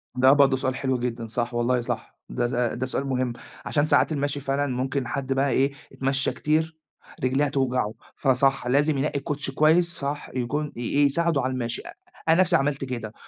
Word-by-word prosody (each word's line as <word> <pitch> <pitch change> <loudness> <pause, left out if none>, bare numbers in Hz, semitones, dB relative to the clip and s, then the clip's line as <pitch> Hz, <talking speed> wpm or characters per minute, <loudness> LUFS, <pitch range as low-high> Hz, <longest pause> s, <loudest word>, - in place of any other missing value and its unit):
ده 130 +1 +6
برضه 140 -2 +5
سؤال 130 0 -1
حلو 130 -1 0
جدًا، 120 -1 -3
صح، 120 +2 -2
والله 120 +1 +1
صح. 120 - -5
ده - - -1
ده 120 -1 0
ده 130 - -2
سؤال 135 +2 -2
مهم 130 -2 -1 0.3
عشان 145 0 +1
ساعات 155 - +3
المشي 145 -1 -1
فعلًا 140 +1 -1
ممكن 130 0 -2
حد 135 +1 -2
بقى 135 +1 +1
إيه، 135 +1 +2 0.2
يتمشى 135 0 0
كتير، 160 +1 0 0.5
رجليه 135 +3 +2
هتوجعه، 130 -6 0 0.2
فصح، 135 -1 +2
لازم 145 +3 +2
ينقي 140 +1 0
الكوتشي 145 -1 -3
كويس، 165 +5 +3
صح، 145 +1 -4
يكون 145 +4 -2
ي - - -8
إيه، 145 +4 +2
يساعده 160 +1 +1
على 130 +1 -1
المشي. 120 -2 -2
أ - - -7 0.4
أنا 165 +3 +6
نفسي 185 - +3
عملت 140 0 +1
كده، 120 -4 -5
135 Hz, 190 wpm, -25 LUFS, 125-145 Hz, 0.5 s, ده